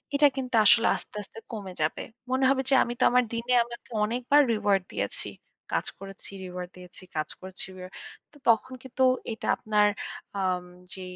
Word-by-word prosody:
এটা 290 +1 +7
কিন্তু 255 -2 -2
আসলে 225 +3 +7
আস্তে, - - -9
আস্তে 215 +3 -12
কমে 200 -4 -6
যাবে। 155 +1 0 0.3
মনে 260 +1 +2
হবে 270 -1 +3
যে - - +3
আমি 240 - -3
তো - - +3
আমার 250 0 +4
দিনে 230 +2 -1
আমাকে 235 0 -11 0.2
অনেকবার 250 +6 +3
রিওয়ার্ড 205 -3 +2
দিয়েছি। - - +1 0.5
কাজ - - +1
করেছি, 195 0 -8
রিওয়ার্ড 180 0 -6
দিয়েছি, 180 +1 -10
কাজ 155 -1 -1
করেছি 185 0 -2
রিও 185 0 -8 0.4
তো 290 - -16
তখন 230 +3 +3
কিন্তু 260 0 -1 0.3
এটা 220 - -6
আপনার 210 -1 +3 0.5
আম 185 -2 0 0.3
যে, 190 - -5
215 Hz, 170 wpm, -27 LUFS, 190-250 Hz, 0.5 s, এটা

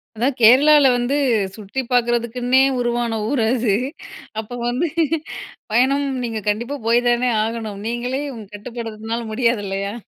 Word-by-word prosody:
அதா, 235 +4 0
கேரளால 280 +6 +6
வந்து 245 +3 0 0.4
சுத்தி 215 +5 -4
பார்க்குறதுக்குன்னே 245 +1 +1 0.2
உருவான 240 -2 -1
ஊர் 260 0 0
அது 235 -5 +1 0.6
அப்ப 225 +3 -6
வந்து 250 +8 0 0.8
பயணம் 265 +5 +2 0.2
நீங்க 225 -2 -3
கண்டிப்பா 235 +7 -2
போய் 235 +1 +4
தானே 240 +1 +2
ஆகணும். 220 -2 -4
நீங்களே 245 +3 -2
உங்க 220 -2 -9
கட்டுப்படுச்சுறதுனால 225 0 -5
முடியாது 235 -2 +1
இல்லயா? 195 +1 -3
240 Hz, 125 wpm, -20 LUFS, 220-250 Hz, 0.8 s, கேரளால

